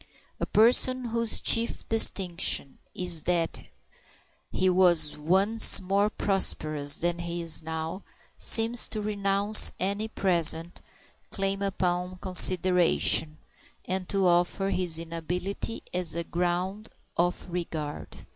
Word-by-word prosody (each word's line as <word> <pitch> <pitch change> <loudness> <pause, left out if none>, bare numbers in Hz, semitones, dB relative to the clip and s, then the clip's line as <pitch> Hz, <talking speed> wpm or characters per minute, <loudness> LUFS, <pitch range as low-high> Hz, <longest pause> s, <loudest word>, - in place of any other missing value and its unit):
A - - -4
person 250 +3 +2
whose 230 0 0
chief 230 0 +1
distinction 185 -9 0 0.2
is 175 -3 0
that 170 -2 -2 0.9
he 185 - -1
was 175 -4 +2
once 195 +10 +4
more 195 +2 -1
prosperous 155 -8 0
than 175 0 -2
he 170 0 -6
is 165 -1 -1
now 160 +3 -7 0.3
seems 230 +1 +2
to 215 - -5
renounce 205 0 +3
any 200 +3 -3
present 170 -4 +1 0.5
claim 195 0 -4
upon 180 -2 -3
consideration, 180 -4 +3 0.5
and 185 -1 -5
to 195 -1 -1
offer 180 +3 0
his 175 -4 +2
inability 175 +6 -6
as 180 -3 -2
a 170 - -4
ground 180 +5 -4 0.3
of 175 +1 -2
regard. 165 -4 -7
180 Hz, 110 wpm, -25 LUFS, 170-200 Hz, 0.9 s, once